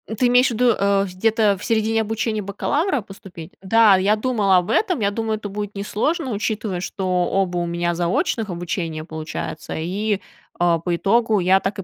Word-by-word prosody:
Ты 250 +3 +2
имеешь 245 +1 +5
в - - -2
виду, 240 +1 +3
э, 200 0 +2
где-то 205 +2 +1
в - - -8
середине 225 0 +1
обучения 220 0 -2
бакалавра 280 - -1
поступить? 190 -5 -11
Да, 210 0 +5
я 200 +3 +2
думала 215 -4 +1
об 180 0 0
этом. 365 - +1
Я 200 -1 +1
думаю, 220 +1 -2
это 205 -1 -7
будет 205 +1 -5
не 200 - -4
сложно, 265 +8 -1
учитывая, 210 -2 -2
что 190 +1 -4 0.2
оба 190 -2 0
у 175 - 0
меня 170 0 -1
заочных 210 - -1
обучения 170 -2 -4
получаются. 155 -1 -6
И, 200 +5 -2 0.4
а, 170 -1 +2
по 175 +1 -1
итогу 220 +3 +2
я 185 +2 +4
так 195 0 -3
и - - -4
200 Hz, 190 wpm, -21 LUFS, 180-225 Hz, 0.4 s, имеешь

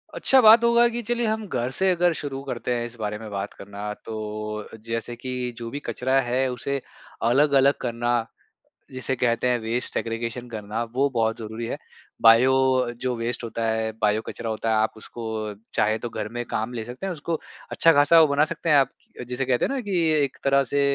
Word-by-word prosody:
अच्छा 265 - +4
बात 225 +1 +8
होगा 235 0 +5
कि 240 +1 -4
चलिए 240 +1 -1
हम 215 -1 -2
घर 120 -8 -2
से 190 0 +3
अगर 175 -1 +2
शुरू 140 -3 -5
करते 125 -2 -3
हैं 120 0 -2
इस 120 0 -8
बारे 105 -1 -3
में 110 -1 -8
बात 100 0 -4
करना, 100 +1 -7
तो 105 -1 -6 0.2
जैसे 115 +1 -3
कि 125 0 -4
जो 115 -1 -6
भी 140 - -5
कचरा 130 +2 +1
है 130 +1 0
उसे 135 +3 -3 0.5
अलग-अलग 140 +1 +4
करना, 120 -1 0 0.7
जिसे 130 0 -3
कहते 120 0 +1
हैं 125 -1 +2
वेस्ट 115 +2 -2
सेग्रीगेशन 115 +1 -3
करना, 110 0 -4
वो 130 +5 0
बहुत 115 -3 0
ज़रूरी 110 +1 -5
है। - - -4 0.4
बायो 115 +3 +7 0.2
अ, 125 -2 +1
जो 125 +1 -3
वेस्ट 115 +1 -3
होता 115 0 -3
है, 110 0 0
बायो 105 0 +2
कचरा 115 - -5
होता 110 +1 -2
है, 110 - +3
आप 110 +1 +1
उसको 110 -1 -5 0.2
चाहे 110 +1 +2
तो - - -2
घर 105 - -4
में 120 - -1
काम 110 +2 -3
ले 115 -2 -4
सकते 125 +10 -7
हैं। 190 - -2
उसको 165 0 -3 0.3
अच्छा 165 - +5
खासा 145 +3 +6
वो 155 - +6
बना 145 +1 +3
सकते 165 - -4
हैं 150 - +6
आप, 135 -2 +4 0.4
जिसे 125 +2 -2
कहते 125 -1 +2
हैं - - -2
ना 275 - -1
कि 200 -5 -2 0.3
एक 135 - -3
तरह 140 0 +4
से 140 - +3
120 Hz, 210 wpm, -24 LUFS, 115-140 Hz, 0.7 s, बात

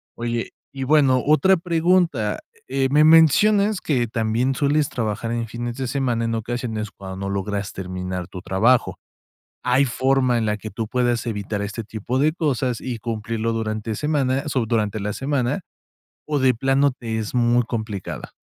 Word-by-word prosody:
Oye, 120 0 -3 0.2
y 135 -1 -5
bueno, 135 -2 +4
otra 185 +6 +4
pregunta, 165 - +1 0.3
eh, 135 0 +1
me 150 +3 +5
mencionas 200 +6 +5
que 125 -6 0
también 115 +4 0
sueles 145 +1 +1
trabajar 115 0 -3
en 115 -1 -2
fines 120 +1 -5
de 135 - -2
semana 120 -3 0
en 115 - -1
ocasiones 115 -1 -3
cuando 95 -1 -9
no 100 0 -4
logras 100 +1 -3
terminar 90 -1 -5
tu 90 - -9
trabajo, 110 +7 +2 0.7
¿hay 125 +2 +4
forma 130 0 +2
en 115 - 0
la 105 0 +1
que 110 +1 -7
tú 110 +2 -4
puedas 120 -1 0
evitar 105 -2 -3
este 105 +3 -5
tipo 110 +4 -4
de 150 +3 +3
cosas 130 -7 -1
y 125 -3 -4
cumplirlo 115 0 -2
durante 110 -1 -3
semana 140 -2 0
sou 130 -5 0
durante 110 -2 0
la 105 +1 -2
semana, 135 - -1 0.7
so 150 -1 +1
de 130 -1 +3
plano 135 +3 +2
te 115 -3 -4
es 110 +1 -4
muy 120 0 +3
complicada? 110 -4 -5
120 Hz, 165 wpm, -22 LUFS, 110-135 Hz, 0.7 s, me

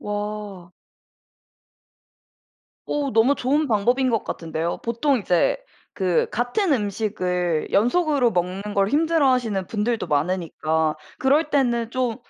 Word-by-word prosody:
와. 205 -3 -5 2.2
어 290 -2 -1
너무 230 +6 +4
좋은 290 +4 0
방법인 245 +4 +2
것 225 -2 0
같은데요? 165 0 -3
보통 245 +4 +1
이제 180 - +1 0.4
그 185 -4 +1
같은 245 - 0
음식을 185 - -1
연속으로 255 - +2
먹는 185 +3 -2
걸 195 0 +2
힘들어하시는 260 - +1
분들도 225 +2 -1
많으니까 160 0 0 0.2
그럴 290 +4 +3
때는 240 -5 +1
좀 250 -3 -1
220 Hz, 240 characters per minute, -23 LUFS, 185-260 Hz, 2.2 s, 너무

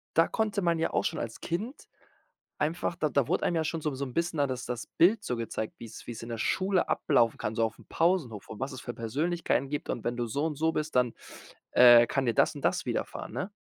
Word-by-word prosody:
da 165 - +5
konnte 215 -2 -1
man 170 -1 +2
ja 165 - 0
auch - - +2
schon - - -1
als 115 -1 -6
Kind 210 - -4 0.7
einfach 170 +3 -1
da 155 -2 0
da 140 -4 +1
wurde - - 0
einem 175 - +1
ja 160 - +1
schon 165 0 -2
so 150 - 0
'n - - -5
so 140 +1 -3
'n 125 - -8
bisschen 170 +1 -1
da 145 - +3
das 130 -1 -4
das 120 -2 -4
Bild 200 +5 +3
so 125 - -2
gezeigt, 110 -1 -4
wie's 115 -1 -10
wie's 115 -2 -6
in 115 - -8
der 115 - -3
Schule 190 - +1
ablaufen 115 -2 +2
kann, 110 +1 -3
so 115 - +2
aufm 110 - -7
Pausenhof 165 - 0
und 110 - -8
was 135 +2 -3
es 130 - -7
für 120 - -5
Persönlichkeiten 140 +4 -1
gibt. 145 +3 -4
Und 115 - -2
wenn 120 0 -1
du 120 - -1
so 140 +7 -1
und 155 -2 -2
so 160 +2 +1
bist, 155 0 -3
dann, 125 -2 +3 0.6
äh, 120 -1 +8
kann 135 +2 0
dir 115 - +2
das - - +4
und - - -7
das - - +1
widerfahren, - - -4
ne? 200 - -4
140 Hz, 255 wpm, -29 LUFS, 120-170 Hz, 0.7 s, äh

